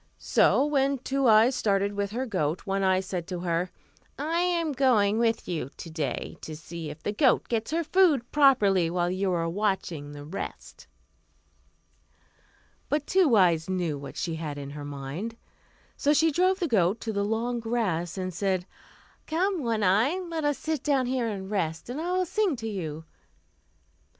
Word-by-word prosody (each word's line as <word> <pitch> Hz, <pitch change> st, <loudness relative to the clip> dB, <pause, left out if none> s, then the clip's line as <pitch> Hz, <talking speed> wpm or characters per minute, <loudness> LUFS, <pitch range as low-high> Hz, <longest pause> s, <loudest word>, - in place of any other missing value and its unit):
So 280 Hz, -, +3 dB
when 275 Hz, -2 st, +1 dB
Two 270 Hz, +1 st, 0 dB
Eyes 225 Hz, +3 st, +6 dB
started 200 Hz, -3 st, +1 dB
with 200 Hz, 0 st, -2 dB
her 245 Hz, +5 st, -3 dB
goat, 180 Hz, -, -1 dB
One 195 Hz, 0 st, -1 dB
Eye 190 Hz, -1 st, +3 dB
said 180 Hz, -3 st, -5 dB
to 180 Hz, -2 st, -4 dB
her, 175 Hz, 0 st, -1 dB, 0.5 s
"I 320 Hz, +4 st, -1 dB
am 345 Hz, -3 st, +1 dB
going 230 Hz, -6 st, +3 dB
with 230 Hz, -1 st, +1 dB
you 160 Hz, -7 st, -3 dB
to 165 Hz, -, -8 dB
day 150 Hz, -6 st, -3 dB
to 155 Hz, -, -7 dB
see 165 Hz, 0 st, -7 dB
if 150 Hz, +2 st, -10 dB
the -, -, -1 dB
goat 250 Hz, +4 st, +3 dB
gets 225 Hz, -1 st, -1 dB
her 330 Hz, +3 st, 0 dB
food 315 Hz, -8 st, +3 dB
properly 210 Hz, -, +4 dB
while 175 Hz, 0 st, 0 dB
you 190 Hz, +1 st, 0 dB
are 165 Hz, -2 st, 0 dB
watching 175 Hz, -6 st, -2 dB
the 145 Hz, 0 st, -9 dB
rest." 160 Hz, +6 st, -7 dB, 2.0 s
But 295 Hz, 0 st, 0 dB
Two 360 Hz, -10 st, +4 dB
Eyes 175 Hz, -4 st, +3 dB
knew 175 Hz, -5 st, -1 dB
what 140 Hz, -, -9 dB
she 165 Hz, -2 st, -2 dB
had 150 Hz, -3 st, -5 dB
in 140 Hz, -1 st, -6 dB
her 145 Hz, 0 st, -7 dB
mind. 145 Hz, +11 st, -6 dB, 0.6 s
So 290 Hz, -, +3 dB
she 320 Hz, +2 st, +4 dB
drove 370 Hz, +5 st, +2 dB
the 355 Hz, -3 st, -1 dB
goat 200 Hz, -, +2 dB
into 225 Hz, -1 st, -4 dB
the 200 Hz, 0 st, 0 dB
long 230 Hz, +3 st, -1 dB
grass, 200 Hz, -8 st, -1 dB
and 185 Hz, -1 st, -3 dB
said, 185 Hz, 0 st, -1 dB, 0.6 s
"Come, 360 Hz, +2 st, 0 dB
One 230 Hz, -4 st, 0 dB
Eye, 215 Hz, -, +3 dB
let 335 Hz, -4 st, -4 dB
us 290 Hz, -1 st, +1 dB
sit 315 Hz, -4 st, -2 dB
down 275 Hz, -3 st, +1 dB
here 250 Hz, -1 st, 0 dB
and 195 Hz, -2 st, -5 dB
rest, 165 Hz, +1 st, -2 dB
and 285 Hz, +5 st, -4 dB
I 350 Hz, +2 st, -2 dB
will 370 Hz, 0 st, +1 dB
sing 395 Hz, -2 st, 0 dB
to 225 Hz, -2 st, -6 dB
you." 160 Hz, -7 st, -5 dB
210 Hz, 180 wpm, -27 LUFS, 175-275 Hz, 2.0 s, Eyes